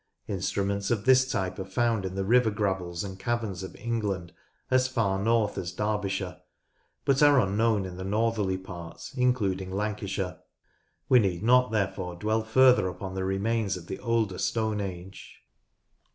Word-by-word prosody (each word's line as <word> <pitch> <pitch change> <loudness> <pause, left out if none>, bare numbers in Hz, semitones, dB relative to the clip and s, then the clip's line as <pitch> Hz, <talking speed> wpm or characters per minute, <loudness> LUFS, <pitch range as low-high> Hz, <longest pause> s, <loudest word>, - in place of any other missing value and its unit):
Instruments 100 +1 -1
of 110 -3 0
this 130 0 +5
type 95 -3 -2
are - - -2
found 110 +1 0
in 95 0 -4
the 95 0 -1
river 120 +2 +4
gravels 95 -4 -2
and 95 -1 -7
caverns 110 -5 -2
of 95 -2 -8
England 105 -7 -3 0.4
as 130 0 +4
far 110 -7 0
north 110 -1 +1
as 90 -2 -4
Derbyshire, 105 -2 -2 0.6
but 140 -1 +3
are 145 -2 +7
unknown 105 -1 +2
in 90 -1 -7
the 95 - -5
northerly 105 -1 0
parts 90 -3 -9
including 105 -8 +1
Lancashire. 100 -2 -3 0.7
We 125 - +6
need 95 -4 0
not, 125 +1 +4
therefore, 95 -4 -1
dwell 110 +5 0
further 125 -1 +5
upon 95 +1 -6
the 95 0 -2
remains 100 +1 0
of 85 - -10
the 95 - -6
older 115 -5 0
Stone 110 -2 0
Age. 95 0 -8
100 Hz, 155 wpm, -28 LUFS, 95-115 Hz, 0.7 s, are